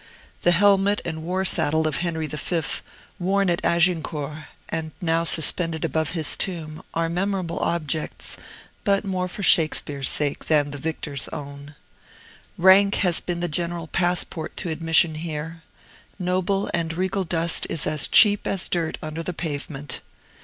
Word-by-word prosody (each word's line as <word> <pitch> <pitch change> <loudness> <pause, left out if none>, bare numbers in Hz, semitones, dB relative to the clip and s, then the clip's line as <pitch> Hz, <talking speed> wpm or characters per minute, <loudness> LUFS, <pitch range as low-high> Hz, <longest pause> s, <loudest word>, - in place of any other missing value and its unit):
The - - +3
helmet 200 +2 +4
and 160 -1 -4
war 185 +3 -2
saddle 160 -2 +2
of 155 - -1
Henry 165 -2 -2
V., 160 +3 -2 0.6
worn 190 +1 +1
at 170 - -2
Agincourt, 160 -3 0 0.2
and 160 -1 -4
now 165 -2 +1
suspended 165 0 +1
above 160 0 -1
his 160 -4 +2
tomb, 160 -4 -3
are 165 0 +1
memorable 180 0 -2
objects, 160 -2 -2 0.5
but 200 0 +1
more 185 -2 -2
for 200 +3 -6
Shakespeare's 150 -5 +4
sake 145 -1 -2
than 145 -2 +2
the 145 - -7
victor's 145 -4 -3
own. 145 0 -9 0.8
Rank 195 +2 +6
has 175 -2 +5
been 175 -1 -4
the 175 - 0
general 170 +1 -2
passport 175 -1 -2
to 175 - -3
admission 165 0 +3
here. 160 +1 -6 0.6
Noble 185 +1 -1
and 165 -1 -1
regal 190 +3 -1
dust 165 -1 +2
is 160 - -1
as 150 -1 +2
cheap 205 -2 +5
as 190 -2 +1
dirt 165 -2 -1
under 155 +1 -5
the 180 +2 -4
pavement. 145 -3 -4
165 Hz, 145 wpm, -23 LUFS, 155-180 Hz, 0.8 s, Rank